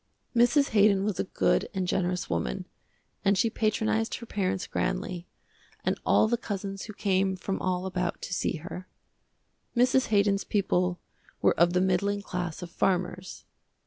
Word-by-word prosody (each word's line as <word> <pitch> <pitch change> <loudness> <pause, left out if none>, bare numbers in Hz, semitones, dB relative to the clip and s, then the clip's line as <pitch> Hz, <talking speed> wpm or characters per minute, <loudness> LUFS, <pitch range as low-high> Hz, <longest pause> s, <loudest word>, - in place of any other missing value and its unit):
Mrs. 245 +5 +4
Haydon 200 -2 +4
was 210 -3 -1
a - - 0
good - - +1
and 185 -1 -1
generous 180 0 0
woman, 85 -8 -2 0.6
and 200 0 +3
she 225 +4 +2
patronized 220 0 0
her 235 - -8
parents 190 -3 -1
grandly, 180 -2 -2 0.6
and - - 0
all - - +4
the 240 +2 +1
cousins 195 -3 -5
who 215 - -8
came 190 -1 +1
from 190 +1 -3
all 185 0 -1
about 180 -1 -2
to - - -4
see - - 0
her. 180 +3 -8 0.9
Mrs. 255 +2 +4
Haydon's 200 -1 +2
people 180 -3 0 0.4
were - - +4
of 170 +1 +3
the 180 - +3
middling 200 +2 +1
class 180 -4 -4
of 175 - -8
farmers. 185 +1 -1
190 Hz, 155 wpm, -28 LUFS, 180-210 Hz, 0.9 s, Mrs